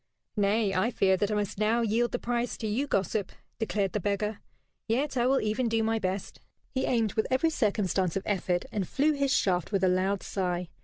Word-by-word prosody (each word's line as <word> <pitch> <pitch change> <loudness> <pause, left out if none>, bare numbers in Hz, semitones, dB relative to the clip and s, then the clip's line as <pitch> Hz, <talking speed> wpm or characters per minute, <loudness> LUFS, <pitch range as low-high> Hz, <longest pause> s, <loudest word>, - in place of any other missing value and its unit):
"Nay, 205 0 +2
I 195 +5 +2
fear 195 -5 +3
that 205 +2 0
I 210 - 0
must 205 -1 -2
now 220 +2 +2
yield 230 +2 +1
the - - 0
prize 240 0 -2
to 225 - -5
you, 230 +7 0
gossip," 195 -3 -1 0.3
declared 205 -4 -1
the 210 - 0
beggar. 205 +2 -1 0.5
"Yet 270 +6 0
I 245 -1 +2
will 270 +1 +3
even 215 +3 0
do 225 0 +1
my 225 0 +1
best." 190 -1 -3 0.3
He 260 - 0
aimed 225 -4 +1
with 220 - 0
every 265 +6 +2
circumstance 195 - 0
of 195 - -1
effort, 180 -3 0
and 195 -4 -2
flew 290 +3 +2
his 280 -2 0
shaft 180 -6 +1
with 195 -2 +1
a - - +5
loud 185 +2 +1
sigh. 180 -2 -2
210 Hz, 210 wpm, -28 LUFS, 195-235 Hz, 0.5 s, a